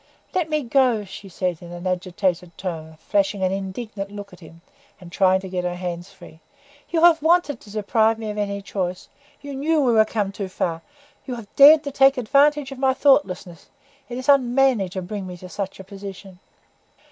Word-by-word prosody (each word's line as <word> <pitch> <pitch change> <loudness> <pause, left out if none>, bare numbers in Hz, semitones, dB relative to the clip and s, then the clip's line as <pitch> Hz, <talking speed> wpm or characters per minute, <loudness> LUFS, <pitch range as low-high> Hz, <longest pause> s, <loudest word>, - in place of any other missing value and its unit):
"Let 350 -4 0
me 305 -1 0
go!" 245 -4 +2
she 195 +1 -10
said, 180 -2 -3
in 175 0 -10
an 175 +1 -8
agitated 180 -1 -2
tone, 160 -4 -6
flashing 195 +2 0
an 185 - +1
indignant 195 +1 -5
look 205 -1 -9
at 180 - -14
him, 165 -1 -15 0.4
and 180 -3 -13
trying 190 0 +3
to 190 - -7
get 180 -1 -3
her 175 0 -2
hands 175 -1 -5
free. 165 -2 -15 0.5
"You 330 -1 0
have 335 -2 +6
wanted 320 -4 +2
to 210 - -15
deprive 220 +1 +1
me 220 -1 -5
of 210 - -8
any 200 -1 -3
choice. 185 -2 -4 0.3
You 285 0 -7
knew 310 +4 +1
we 260 -4 +3
were 220 -1 +6
come 210 -3 -2
too 200 -1 -5
far; 165 -2 -2 0.5
you 250 - -3
have 225 -4 -11
dared 295 +2 +8
to 285 - -4
take 270 0 +4
advantage 280 +3 +2
of 270 - -8
my 265 -1 +2
thoughtlessness. 195 - +1 0.4
It 245 - -5
is 255 +2 -6
unmanly 260 -6 +3
to 185 +1 -5
bring 195 0 -6
me 180 - -7
into 180 +1 -11
such 195 0 -5
a - - -8
position." 195 -1 -10
200 Hz, 200 wpm, -22 LUFS, 185-265 Hz, 0.5 s, dared